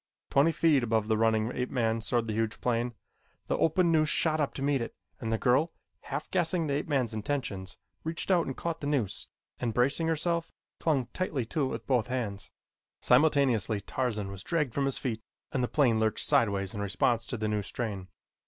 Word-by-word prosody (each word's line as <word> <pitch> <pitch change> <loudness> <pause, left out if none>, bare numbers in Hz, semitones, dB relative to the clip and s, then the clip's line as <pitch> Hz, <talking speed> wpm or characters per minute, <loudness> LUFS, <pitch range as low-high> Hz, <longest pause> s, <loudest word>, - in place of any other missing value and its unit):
Twenty 145 +4 +5
feet 160 -4 +3
above 110 -2 +1
the 110 - +2
running 110 +1 +2
ape 125 0 -2
man 115 -3 0
soared 115 +1 0
the 110 - -3
huge 110 0 -1
plane. 120 0 0 0.5
The - - 0
open 170 +2 +3
noose 155 -1 +3
shot 155 -1 +1
up 145 - -1
to 135 - -4
meet 140 -2 +2
it, 115 - -5 0.2
and 115 - -3
the 115 - +2
girl, 135 +8 +2 0.3
half - - -4
guessing 175 -2 +1
the 145 - -1
ape 145 - -1
man's 130 -7 +1
intentions, 110 -5 -3 0.3
reached 165 +4 -2
out 175 -3 +3
and 135 - -4
caught 165 -1 -3
the 145 - -2
noose 135 -10 -1 0.3
and, 115 -3 -2
bracing 140 +7 +2
herself, 165 +1 0 0.3
clung 145 -6 +1
tightly 155 -9 -1
to 140 +5 0
it - - 0
with - - -5
both 125 -5 +2
hands. 110 -6 -3 0.5
Simultaneously 125 -6 +3
Tarzan 105 -2 -2
was 100 -1 -7
dragged 150 - 0
from 140 - +1
his 135 - +1
feet 115 -4 -3 0.3
and 130 - 0
the - - +1
plane 120 -7 +3
lurched 110 -1 +1
sideways 100 -3 +2
in 100 - -4
response 110 +3 +1
to 125 - -3
the 110 0 -1
new 105 -1 0
strain. 100 -3 -4
125 Hz, 200 wpm, -29 LUFS, 110-150 Hz, 0.5 s, Twenty